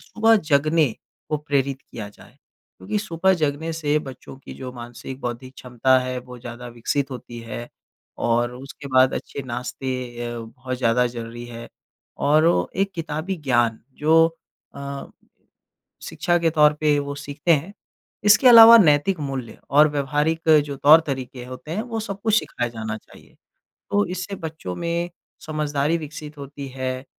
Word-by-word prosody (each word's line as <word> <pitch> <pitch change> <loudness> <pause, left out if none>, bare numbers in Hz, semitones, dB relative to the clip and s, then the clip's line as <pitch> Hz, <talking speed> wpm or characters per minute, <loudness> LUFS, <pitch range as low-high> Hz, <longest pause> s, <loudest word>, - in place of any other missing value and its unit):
सुबह 225 0 +3
जगने 150 -1 +3 0.4
को 150 - 0
प्रेरित 140 -2 -1
किया 105 -3 -7
जाए। 100 - -18 0.4
क्योंकि 95 - -2
सुबह 190 -2 +1
जगने 155 0 -1
से 150 -2 0
बच्चों 135 -2 -10
की 135 - -11
जो 130 -1 -7
मानसिक 120 +2 -9
बौद्धिक 125 +2 -6
क्षमता 130 +1 +2
है 130 0 -3
वो 125 0 -11
ज़्यादा 120 0 -8
विकसित 135 +4 -1
होती 120 -1 -8
है 120 +1 -6 0.6
और 120 +1 +1
उसके 135 +2 -10
बाद 130 0 +4
अच्छे 140 - -5
नाश्ते 125 +2 -4 0.4
अ, 120 0 -5
बहुत 125 +3 -6
ज़्यादा 125 0 +2
ज़रूरी 120 0 -7
है। 115 0 -9 0.6
और 155 +2 +5
ओ 170 - +3 0.2
एक 195 - -2
किताबी 165 +3 -3
ज्ञान 120 -6 +1 0.2
जो 160 +2 +5 0.5
अ, 140 0 -6 1.0
शिक्षा 175 0 0
के 165 -1 +2
तौर 150 -1 +5
पे 150 -1 +3
वो 140 0 -3
सीखते 145 +4 -1
हैं, 165 +6 0 0.5
इसके 210 +5 +6
अलावा 230 -1 +11
नैतिक 160 0 +4
मूल्य 135 -5 -5
और 150 +2 +6
व्यावहारिक 150 +3 -1 0.2
जो 140 -1 -5
तौर-तरीके 135 -4 +3
होते 130 +4 -10
हैं 210 +5 -1
वो 230 -2 -4
सब 200 -2 -6
कुछ 220 -1 +3
सिखाया 120 - -3
जाना 110 -1 -5
चाहिए। - - -19 0.6
तो 205 0 +3
इससे 185 +2 -5
बच्चों 155 - -6
में 170 +1 -2 0.4
समझदारी 150 0 0
विकसित 150 -1 -9
होती 140 0 -8
है 130 0 -3
140 Hz, 155 wpm, -23 LUFS, 125-160 Hz, 1.0 s, अलावा